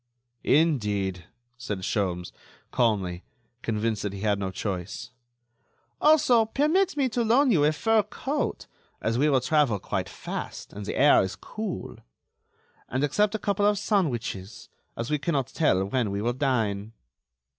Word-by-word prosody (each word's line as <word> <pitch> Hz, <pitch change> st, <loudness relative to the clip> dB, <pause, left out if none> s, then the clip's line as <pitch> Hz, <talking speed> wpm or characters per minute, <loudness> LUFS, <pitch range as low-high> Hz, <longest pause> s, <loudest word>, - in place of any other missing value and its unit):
"Indeed!" 105 Hz, -, +1 dB, 0.3 s
said 105 Hz, -5 st, -4 dB
Sholmes, 90 Hz, -4 st, -1 dB, 0.4 s
calmly, 95 Hz, -7 st, 0 dB, 0.4 s
convinced 110 Hz, -1 st, -1 dB
that 100 Hz, -1 st, -3 dB
he 100 Hz, -, -7 dB
had 105 Hz, -1 st, +1 dB
no 95 Hz, -1 st, -2 dB
choice. 95 Hz, +6 st, -5 dB, 0.9 s
"Also, 300 Hz, -7 st, +5 dB
permit 305 Hz, -, +1 dB
me 275 Hz, -2 st, +3 dB
to 235 Hz, +1 st, 0 dB
loan 250 Hz, +4 st, +4 dB
you 160 Hz, -8 st, +4 dB
a 150 Hz, -, +4 dB
fur 225 Hz, +8 st, +2 dB
coat, 270 Hz, +8 st, -3 dB, 0.3 s
as 115 Hz, +2 st, -1 dB
we 150 Hz, +2 st, +4 dB
will 135 Hz, -3 st, +3 dB
travel 145 Hz, -5 st, +2 dB
quite -, -, -3 dB
fast -, -, -6 dB
and 105 Hz, 0 st, -7 dB
the -, -, -3 dB
air 145 Hz, +2 st, +6 dB
is 95 Hz, 0 st, -3 dB
cool. 215 Hz, -4 st, -6 dB, 0.9 s
And 130 Hz, +3 st, -1 dB
accept 205 Hz, +9 st, +2 dB
a -, -, +1 dB
couple 205 Hz, -1 st, +1 dB
of 210 Hz, 0 st, +2 dB
sandwiches, 120 Hz, -, -2 dB, 0.3 s
as 115 Hz, +4 st, -3 dB
we 150 Hz, -, +1 dB
cannot 140 Hz, -4 st, 0 dB
tell 95 Hz, -, +2 dB
when 115 Hz, +2 st, 0 dB
we 100 Hz, 0 st, -2 dB
will 120 Hz, +1 st, +1 dB
dine." 115 Hz, -6 st, -1 dB
130 Hz, 150 wpm, -26 LUFS, -, 0.9 s, air